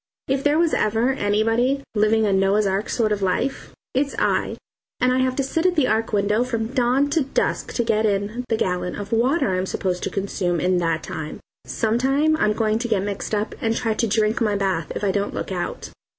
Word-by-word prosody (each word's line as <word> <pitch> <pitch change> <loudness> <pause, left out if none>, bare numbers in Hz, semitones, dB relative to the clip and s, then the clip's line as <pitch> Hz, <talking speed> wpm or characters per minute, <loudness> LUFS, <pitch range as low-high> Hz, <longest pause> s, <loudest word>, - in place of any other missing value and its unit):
If 270 0 0
there 295 +1 +3
was 335 -1 +2
ever 225 +4 +2
anybody 225 +4 +1
"living 215 +1 +3
a 200 - +2
Noah's 195 +2 +3
Ark 195 +2 -1
sort 220 -3 +1
of 205 -1 0
life" 195 +8 -1 0.2
it's 280 +2 0
I, - - +1 0.4
and 250 +1 +3
I 255 - +2
have 255 0 +1
to 275 - 0
sit 325 +6 0
at 360 - +1
the 300 -5 +3
Ark 220 +1 0
window 210 +2 +2
from 230 -3 -2
dawn 255 +3 +2
to 320 +1 +2
dusk 275 - -1
to 240 - 0
get 220 -1 +2
in 205 +4 -1
the 225 - +1
gallon 180 -3 -1
of 205 0 -7
water 240 - +2
I'm 185 +1 -1
supposed 180 -2 -2
to - - -2
consume 190 -3 -1
in 180 +1 +2
that 165 -2 0
time. 155 -1 -6 0.3
Some 225 +1 0
time 285 +5 +2
I'm 210 -8 +2
going 215 0 0
to 240 - -2
get 210 -5 +1
mixed 205 +1 -3
up 210 +1 -2
and 225 0 0
try 225 -2 0
to 230 +2 0
drink 215 +2 +1
my 210 -2 +2
bath, 190 -5 -1
if - - -4
I 200 - +2
don't 200 +1 -2
look - - -4
out. 180 -2 -4
220 Hz, 220 wpm, -22 LUFS, 200-250 Hz, 0.4 s, there